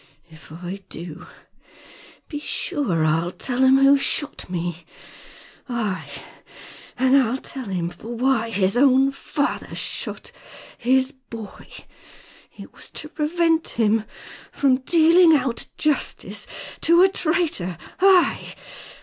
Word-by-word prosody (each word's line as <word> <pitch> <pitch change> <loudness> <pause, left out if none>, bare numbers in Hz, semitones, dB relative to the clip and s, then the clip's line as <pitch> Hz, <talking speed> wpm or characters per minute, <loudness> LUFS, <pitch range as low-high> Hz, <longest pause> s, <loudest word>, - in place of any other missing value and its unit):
If 160 -1 -16
I 175 +4 -7
do, 165 -1 -8 1.0
be 295 - -5
sure 285 - -1
I'll 165 +2 +1
tell 245 +7 -4
him 265 0 +6
who 275 +1 +5
shot 290 -3 -2
me. 175 -1 -4 0.9
Aye, 220 -6 -3 0.9
and 260 +1 +3
I'll 260 -2 +3
tell 265 -1 -8
him 180 -4 -3
for 235 +5 -8
why 240 -2 +1
his 195 -2 +1
own 265 +1 +4
father 285 +1 -3
shot - - -1 0.4
his 260 +2 +2
boy. 230 -6 -11 0.9
It - - -11
was - - -8
to 305 - -7
prevent 325 +1 +1
him 220 -1 +1 0.5
from 265 -2 +2
dealing 330 +3 +5
out 250 -3 -3
justice 300 -2 -2 0.3
to 340 +2 +5
a - - +7
traitor! 315 - 0 0.2
Ay!" 375 -1 +3
260 Hz, 115 wpm, -22 LUFS, 200-295 Hz, 1.0 s, a